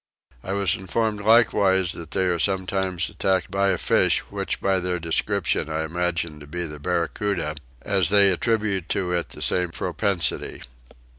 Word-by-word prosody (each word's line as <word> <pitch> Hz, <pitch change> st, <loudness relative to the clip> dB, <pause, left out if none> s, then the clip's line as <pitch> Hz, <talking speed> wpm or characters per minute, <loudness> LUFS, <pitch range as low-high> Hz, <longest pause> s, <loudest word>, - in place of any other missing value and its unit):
I 95 Hz, -, -4 dB
was 100 Hz, -3 st, +2 dB
informed 105 Hz, +3 st, -2 dB
likewise 100 Hz, -5 st, +4 dB
that 85 Hz, -4 st, -6 dB
they 95 Hz, +1 st, 0 dB
were 85 Hz, -1 st, 0 dB
sometimes 95 Hz, -1 st, 0 dB
attacked 95 Hz, -1 st, -1 dB
by 100 Hz, 0 st, +1 dB
a 95 Hz, -2 st, +2 dB
fish -, -, +2 dB
which -, -, -3 dB
by 95 Hz, -1 st, +1 dB
their 90 Hz, 0 st, -2 dB
description 80 Hz, -2 st, 0 dB
I 80 Hz, 0 st, -2 dB
imagine 85 Hz, -1 st, -2 dB
to 75 Hz, -, -12 dB
be 85 Hz, +4 st, -4 dB
the 75 Hz, -2 st, -8 dB
barracoota, 85 Hz, 0 st, -2 dB, 0.3 s
as 100 Hz, -3 st, +2 dB
they 100 Hz, -1 st, +5 dB
attribute 100 Hz, -2 st, 0 dB
to 90 Hz, -2 st, -1 dB
it 85 Hz, -1 st, -1 dB
the -, -, -7 dB
same 90 Hz, -1 st, +1 dB
propensity. 85 Hz, 0 st, -1 dB
95 Hz, 160 wpm, -24 LUFS, 85-100 Hz, 0.3 s, they